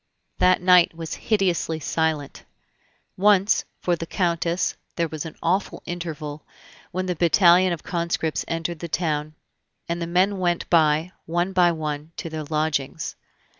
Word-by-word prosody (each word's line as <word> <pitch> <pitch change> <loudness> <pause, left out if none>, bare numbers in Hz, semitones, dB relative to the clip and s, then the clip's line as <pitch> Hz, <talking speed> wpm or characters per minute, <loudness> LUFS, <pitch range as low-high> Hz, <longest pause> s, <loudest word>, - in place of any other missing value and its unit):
That 185 -1 +4
night 180 -2 +5
was 165 -1 -5 0.2
hideously 180 -6 +1
silent. 160 -2 -2 0.7
Once, 200 +1 +4 0.2
for 175 - +1
the 165 0 -6
Countess, 170 -1 0 0.2
there 170 -1 0
was 155 0 -5
an 160 - -10
awful 185 +4 0
interval, 155 -4 -5 0.5
when 185 +1 -3
the 180 -1 -1
battalion 175 +2 +5
of 170 - -4
conscripts 170 -2 -1
entered 165 0 -3
the 170 - -5
town, 155 -2 -1 0.5
and 170 0 -2
the 170 - -2
men 185 +3 +2
went 175 -2 0
by, 160 +1 +3 0.2
one 175 +3 0
by 180 -2 +5
one, 155 -1 -4
to 165 - -5
their 155 -1 -4
lodgings. 150 -2 -2
170 Hz, 145 wpm, -24 LUFS, 155-180 Hz, 0.7 s, night